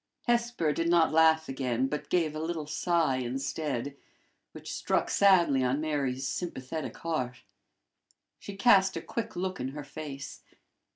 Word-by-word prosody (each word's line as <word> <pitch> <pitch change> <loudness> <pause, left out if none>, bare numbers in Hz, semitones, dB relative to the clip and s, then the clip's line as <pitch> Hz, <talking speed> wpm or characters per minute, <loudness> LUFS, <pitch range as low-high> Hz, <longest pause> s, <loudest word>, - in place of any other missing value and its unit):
Hesper 235 - +1
did 165 +3 0
not 170 -2 +4
laugh 160 0 +4
again, 130 -2 -1
but 150 +2 -4
gave 165 -4 +1
a 155 - -5
little 160 -1 -3
sigh 165 -3 +1
instead, 135 +1 -3 0.6
which - - -8
struck - - 0
sadly 175 -9 +4
on 130 +3 +1
Mary's 140 -4 -1
sympathetic 155 -1 -4
heart. 130 -7 -3 1.0
She 200 - -8
cast 195 -3 +4
a - - -4
quick 230 - -5
look 185 +1 -3
in 125 - -2
her 145 +2 -6
face. 140 -1 -8
155 Hz, 140 wpm, -29 LUFS, 135-170 Hz, 1.0 s, not